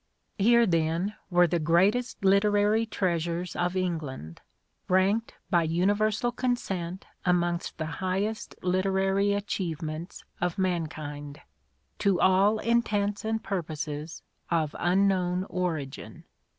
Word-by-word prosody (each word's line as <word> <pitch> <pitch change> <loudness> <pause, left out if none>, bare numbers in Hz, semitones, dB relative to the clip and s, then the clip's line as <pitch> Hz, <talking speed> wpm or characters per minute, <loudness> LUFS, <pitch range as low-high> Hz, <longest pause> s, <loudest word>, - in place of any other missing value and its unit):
Here, 235 +3 +5
then, 170 +2 0 0.2
were 175 -1 +5
the 170 0 0
greatest 195 +9 +2
literary 205 +3 +3
treasures 175 -3 -1
of 175 +1 -1
England, 150 - -4 0.5
ranked 195 +5 +2 0.2
by 175 -2 +4
universal 205 +8 +1
consent 190 -9 -2 0.2
amongst 175 -1 0
the 160 - -3 0.2
highest 195 +4 -2
literary 190 +2 +1
achievements 170 -4 -4 0.2
of 180 -1 -1
mankind, 155 -5 -3 0.6
to 200 -3 +2
all 195 +3 +4
intents 210 -3 0
and 220 +1 -2
purposes 155 -4 -4 0.3
of 160 -3 0
unknown 185 0 +2
origin. 160 -7 -4
185 Hz, 100 wpm, -28 LUFS, 170-205 Hz, 0.6 s, Here